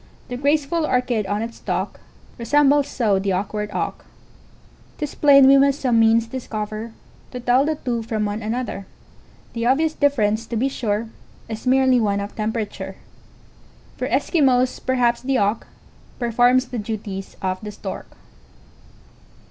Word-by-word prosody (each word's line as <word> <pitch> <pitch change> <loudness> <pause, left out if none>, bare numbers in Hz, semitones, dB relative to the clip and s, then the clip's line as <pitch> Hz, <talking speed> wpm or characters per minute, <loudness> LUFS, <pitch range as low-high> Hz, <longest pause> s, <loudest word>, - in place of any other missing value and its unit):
The 245 - -4
graceful 295 +4 +1
Orchid 250 -7 0
on 205 +3 -1
its 230 0 -7
stalk, - - -3 0.4
Resembles 285 +3 +3
so 215 -8 +1
the 195 0 -1
auk 190 +3 -2
ward 210 0 -3
Auk; - - -4 0.9
'T - - -5
is 295 - -4
plain 275 -2 +6
we 275 +1 +7
must 275 0 +3
some 245 -4 +2
means 225 0 +4
discover, 220 -2 -5 0.4
To 250 - -7
tell 250 +3 +3
the 310 +1 0
two 240 -5 -3
from 220 -1 -2
one 205 +2 -3
another: 220 -3 -4 0.7
The 230 0 -1
obvious 310 +5 +2
difference, 225 -7 +1
to 235 - -4
be 255 +5 +1
sure, 220 -3 -2 0.4
Is 225 +2 -6
merely 260 -1 +4
one 200 -2 +1
of 200 0 -6
temperature. 210 -3 -4 1.0
For - - -3
Eskimos, 255 -6 +2
perhaps, 245 -2 +1
the 265 +1 0
Auk 205 +1 0 0.5
Performs 245 +2 +2
the 245 - -4
duties 205 -3 -6
of 185 0 -2
the 210 -1 -6
Stork. - - -7
235 Hz, 150 wpm, -22 LUFS, 215-265 Hz, 1.0 s, we